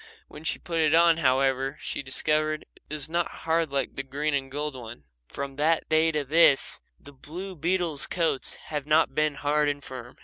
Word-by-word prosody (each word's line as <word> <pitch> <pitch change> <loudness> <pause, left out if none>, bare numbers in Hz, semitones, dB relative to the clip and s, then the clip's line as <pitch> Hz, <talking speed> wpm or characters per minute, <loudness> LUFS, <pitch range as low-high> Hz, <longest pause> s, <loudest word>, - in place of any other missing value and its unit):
When 150 - -12
she 160 - -1
put 165 0 -3
it 155 0 +4
on, 170 -1 +5
however, 135 -1 +1
she - - -4
discovered 155 +3 0
that - - -23
it - - -6
was 145 -1 -3
not 170 +1 0 0.2
hard 165 -1 +1
like 140 -1 -2
the - - -2
green 145 +3 -2
and 135 -1 -1
gold 145 +1 -4
one. 115 - -9 0.2
From 140 -1 -6
that 160 +2 +2
day 160 +1 +4
to 150 -2 -1
this 145 0 +4 0.2
the 145 - -14
blue 180 +8 -8
beetles' 165 -3 0
coats 165 -6 -1
have 150 -2 -6
not 155 +1 +3
been 155 -1 +1
hard 150 +1 +1
and 145 -1 -3
firm. 125 -2 -9
150 Hz, 200 wpm, -27 LUFS, 135-160 Hz, 0.2 s, on